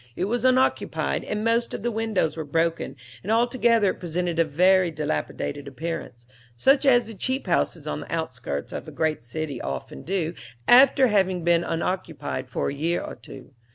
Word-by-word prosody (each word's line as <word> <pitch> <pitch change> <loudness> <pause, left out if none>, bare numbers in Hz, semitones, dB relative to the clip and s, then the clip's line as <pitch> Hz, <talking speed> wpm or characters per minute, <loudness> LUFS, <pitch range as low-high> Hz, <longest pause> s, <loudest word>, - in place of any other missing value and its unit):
It 185 - -1
was 235 +5 -1
unoccupied, 255 0 +1
and 210 0 -3
many 230 +1 +3
of - - -5
the 240 - 0
windows 220 -7 0
were 160 - -4
broken, 165 +3 -1 0.3
and 205 - -3
altogether 230 -3 +3
it - - -10
presented 175 0 -2
a - - +6
very 180 +4 +3
dilapidated 145 - -3
appearance, 140 -4 -6 0.3
such 275 - +4
as 245 -3 +5
the 225 - -6
cheap 260 +7 -2
houses 170 -3 0
on 150 - -3
the - - -9
outskirts 125 - -4
of - - -6
a - - -7
great 155 -6 -1
city 145 +1 -5
often 65 0 -5
do 170 -4 -2 0.3
after 265 +2 +7
having 190 -6 +2
been 170 0 +3
unoccupied 165 -6 -3
for - - -1
a - - -4
year 165 +5 0
or - - -6
two. 135 +1 -12
175 Hz, 180 wpm, -25 LUFS, 155-225 Hz, 0.3 s, after